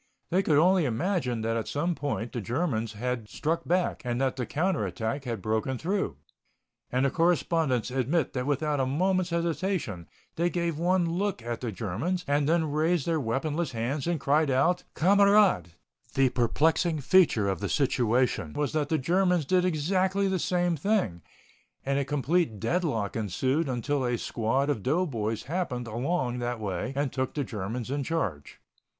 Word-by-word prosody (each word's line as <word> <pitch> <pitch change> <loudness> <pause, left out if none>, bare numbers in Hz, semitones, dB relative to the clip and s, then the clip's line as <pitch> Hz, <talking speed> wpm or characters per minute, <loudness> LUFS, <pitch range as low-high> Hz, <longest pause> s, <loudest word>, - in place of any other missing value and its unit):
They 185 +3 +3
could 155 -6 +2
only 180 +2 +4
imagine 130 - -1
that 115 +1 0
at 115 - -3
some 170 +5 -1
point 140 -7 -3
the 120 - -4
Germans 115 - -1
had 120 0 -3
struck 165 +8 -2
back 180 +1 +1
and 120 -1 -2
that 135 -1 0
the 125 -3 -3
counter 175 +2 0
attack 120 +4 -3
had 115 -6 -4
broken 110 +4 -1
through. 190 +8 -2 0.7
And 130 +2 +2
the 135 - +2
correspondents 165 -7 +1
admit 135 +5 0
that 125 0 -2
without 145 0 0
a 130 - +1
moment's 185 +6 +1
hesitation 170 - -2 0.3
they 170 +2 +2
gave 170 -3 -2
one 175 0 +2
look 180 - -2
at 120 0 -4
the 120 -3 -3
Germans 120 - -3
and 145 +1 +2
then 160 -2 +2
raised 155 +1 +1
their 165 -2 +1
weaponless 145 +5 -2
hands 130 +7 -2
and 170 -2 0
cried 150 +3 +2 0.5
"Kamerad." 200 - +4 0.5
The 135 -1 +4
perplexing 155 +7 +1
feature 140 - +4
of 95 -3 -1
the - - -3
situation 125 - +1
was 145 -1 -1
that 150 -2 0
the 160 - +2
Germans 180 +2 +2
did 180 +4 +2
exactly 185 +4 +1
the 190 -1 0
same 175 0 +1
thing, 150 - 0 0.6
and 140 +1 +1
a 140 - -1
complete 145 - 0
deadlock 115 - -1
ensued 130 - 0
until 130 +3 -1
a 120 -1 0
squad 120 +5 0
of 145 -8 -1
doughboys 125 - -1
happened 140 -7 -3
along 125 +2 -1
that 120 -1 -2
way 100 +2 -3
and 140 -2 -1
took 130 -1 -2
the 145 - 0
Germans 115 +2 -4
in 140 0 -1
charge. 105 - -3
145 Hz, 170 wpm, -28 LUFS, 120-170 Hz, 0.7 s, only